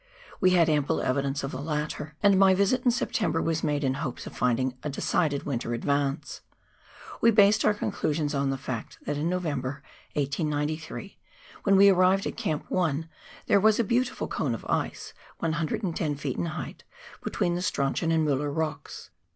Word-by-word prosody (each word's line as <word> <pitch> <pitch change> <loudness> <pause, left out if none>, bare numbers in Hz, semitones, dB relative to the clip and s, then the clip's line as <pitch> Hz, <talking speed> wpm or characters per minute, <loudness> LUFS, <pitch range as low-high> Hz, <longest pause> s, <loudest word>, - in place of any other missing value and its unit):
We 185 - +5
had 175 -3 +4
ample 150 0 +1
evidence 140 +2 -1
of 135 - -3
the 130 - -5
latter, 150 0 -3
and 200 -2 +5
my 190 -1 +6
visit 200 +6 +2
in 250 - +4
September 230 -7 0
was 165 -1 -1
made 145 0 0
in 130 -1 +1
hopes 135 -2 -5
of - - -9
finding 125 +1 +1
a 150 - -3
decided 145 +1 0
winter 120 -4 -2
advance. 140 +3 -1 0.8
We 230 - +6
based 210 -1 +5
our 210 - +3
conclusions 155 -6 -1
on 140 -1 0
the 135 - -1
fact 130 -4 -6
that 145 - -1
in 150 +4 -1
November, 145 -6 -2 0.3
1893, 150 +5 -2 0.5
when 195 -1 +5
we 200 +1 +8
arrived 185 +1 +4
at - - -3
Camp 155 -2 -2
1, 160 -3 0 0.4
there 200 - +4
was 215 +2 +4
a - - +4
beautiful 245 +4 0
cone - - -1
of - - -10
ice, - - -2 0.2
110 165 -1 -1
ft. 140 -2 -3
in - - -2
height, 155 - -6 0.4
between 175 - 0
the 175 - -2
Strauchon 165 0 0
and 160 -1 +2
Mueller 145 0 0
Rocks. 155 -1 -4
155 Hz, 175 wpm, -27 LUFS, 140-185 Hz, 0.8 s, we